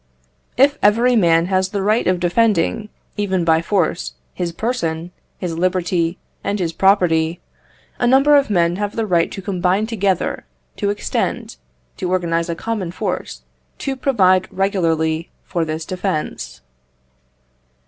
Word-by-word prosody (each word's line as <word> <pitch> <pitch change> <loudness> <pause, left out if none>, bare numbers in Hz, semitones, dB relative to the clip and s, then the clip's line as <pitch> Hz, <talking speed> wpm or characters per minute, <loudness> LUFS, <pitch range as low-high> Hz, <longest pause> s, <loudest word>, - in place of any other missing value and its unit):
If 280 +3 +4
every 235 +4 +4
man 170 -5 +4
has 185 0 +1
the 200 -1 -2
right 215 +3 +2
of 185 -1 +2
defending, 210 +2 +1 0.3
even 190 -4 0
by 160 -1 +4
force, 165 - -1 0.2
his 175 -1 -3
person, 170 -5 -3 0.3
his 175 -3 -4
liberty, 180 -1 0 0.3
and 205 - -1
his 170 -4 -2
property, 175 -3 +2 0.6
a 245 - +2
number 275 +4 +5
of 280 -4 +3
men 175 -3 +2
have 205 0 -3
the 225 - 0
right 175 -4 +1
to 195 - -7
combine 185 +2 +1
together, 200 -5 -1 0.3
to 200 - 0
extend, 205 - -2 0.4
to 180 - -3
organize 170 -2 0
a 170 - -1
common 210 -1 -3
force, - - -4 0.3
to 275 -1 -3
provide 190 -9 +3
regularly 165 -4 0
for 170 -3 -2
this 160 0 -4
defence. 185 - -4
185 Hz, 140 wpm, -19 LUFS, 170-205 Hz, 0.6 s, number